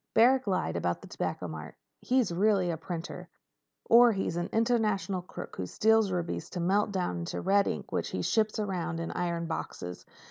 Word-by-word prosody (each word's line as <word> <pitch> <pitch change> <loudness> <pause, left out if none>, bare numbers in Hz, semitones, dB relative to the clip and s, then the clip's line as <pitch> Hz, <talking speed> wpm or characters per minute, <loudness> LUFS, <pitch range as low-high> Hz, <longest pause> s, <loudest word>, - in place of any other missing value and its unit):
Barrack 255 +2 +5
lied 185 - 0
about 85 0 -1
the - - -9
Tobacco 90 - -3
Mart. 80 -1 -8 0.2
He's 250 -6 +1
really 190 -1 +2
a - - -2
printer. 165 +1 -6 0.6
Or 240 +1 +7
he's 195 -4 -2
an 175 0 -2
international 215 -5 +1
crook 180 - -9
who 90 - -3
steals 220 - +3
rubies 175 -2 -3
to 180 - -5
melt 200 +4 +2
down 180 - -1
into 85 - -4
red 200 +1 +3
ink - - -4
which - - -1
he - - -3
ships 220 -1 +1
around 185 -5 -2
in 165 - -3
iron 170 -1 -2
boxes. 90 - -5
185 Hz, 180 wpm, -29 LUFS, 165-215 Hz, 0.6 s, Or